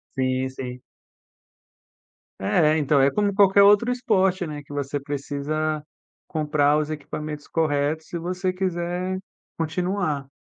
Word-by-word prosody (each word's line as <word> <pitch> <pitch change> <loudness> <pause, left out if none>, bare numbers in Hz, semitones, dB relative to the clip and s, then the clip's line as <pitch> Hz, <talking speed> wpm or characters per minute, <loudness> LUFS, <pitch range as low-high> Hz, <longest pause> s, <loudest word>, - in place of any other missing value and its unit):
Sim, 130 0 0
sim. 125 -1 -7 1.6
É, 155 - +3
então, 145 -2 +3
é 135 - +5
como 205 +5 0
qualquer 200 0 +6
outro 205 +4 +5
esporte, 190 -7 +1
né, 150 -2 -6
que 145 - -15
você 145 0 -2
precisa 145 +2 -2 0.5
comprar 150 -1 +2
os 155 0 -1
equipamentos 150 0 -6
corretos 155 0 0
se 175 - -5
você 180 +2 -2
quiser 180 0 -2 0.4
continuar. 165 -3 -1
155 Hz, 120 wpm, -24 LUFS, 145-185 Hz, 1.6 s, qualquer